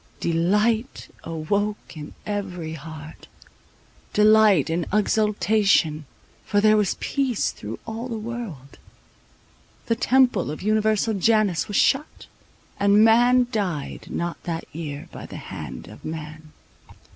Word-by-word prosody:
Delight 210 Hz, +9 st, 0 dB
awoke 200 Hz, +6 st, -2 dB
in 150 Hz, -1 st, -9 dB
every 185 Hz, -6 st, -4 dB
heart, 155 Hz, 0 st, -10 dB, 0.9 s
delight 210 Hz, -6 st, +5 dB
and 165 Hz, +1 st, -1 dB
exultation; 210 Hz, -7 st, +2 dB, 0.4 s
for 205 Hz, -, +1 dB
there 215 Hz, +1 st, +5 dB
was 210 Hz, -3 st, +1 dB
peace 265 Hz, -6 st, 0 dB
through 105 Hz, +2 st, -7 dB
all 225 Hz, +2 st, -5 dB
the 230 Hz, -, -3 dB
world; 215 Hz, -, -7 dB, 1.1 s
the 230 Hz, -, +1 dB
temple 250 Hz, -, +3 dB
of 150 Hz, -, -6 dB
Universal 215 Hz, +1 st, +2 dB
Janus 215 Hz, -4 st, +2 dB
was 205 Hz, -, -1 dB
shut, 280 Hz, +3 st, +1 dB, 0.5 s
and 200 Hz, +2 st, +5 dB
man 245 Hz, +2 st, +5 dB
died 185 Hz, -, -3 dB
not 170 Hz, 0 st, -4 dB
that 165 Hz, -1 st, -3 dB
year 150 Hz, -3 st, -6 dB
by -, -, -9 dB
the -, -, -8 dB
hand -, -, -8 dB
of -, -, -13 dB
man. 155 Hz, 0 st, -7 dB
205 Hz, 120 wpm, -23 LUFS, 160-220 Hz, 1.1 s, delight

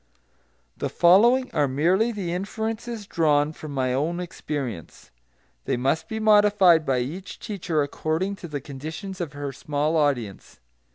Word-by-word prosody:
The -, -, -2 dB
following 235 Hz, +9 st, +4 dB
are 150 Hz, -3 st, +2 dB
merely 175 Hz, -, +2 dB
the 190 Hz, -6 st, -4 dB
inferences 220 Hz, +3 st, -4 dB
drawn 150 Hz, -4 st, +2 dB
from 155 Hz, -1 st, -9 dB
my 130 Hz, -2 st, 0 dB
own 160 Hz, +6 st, -1 dB
experience. 145 Hz, -, -6 dB, 0.5 s
They -, -, 0 dB
must 140 Hz, +6 st, 0 dB
be 220 Hz, -, -4 dB
modified 205 Hz, -6 st, +5 dB
by 130 Hz, -2 st, +2 dB
each 170 Hz, +10 st, -6 dB
teacher 175 Hz, -8 st, -1 dB
according 160 Hz, +7 st, -2 dB
to 175 Hz, -, -8 dB
the 145 Hz, -3 st, -5 dB
conditions 160 Hz, +8 st, -7 dB
of 155 Hz, -5 st, -4 dB
her 145 Hz, -1 st, -4 dB
small 145 Hz, +3 st, -1 dB
audience. 135 Hz, -10 st, -1 dB
160 Hz, 140 wpm, -24 LUFS, 145-195 Hz, 0.5 s, modified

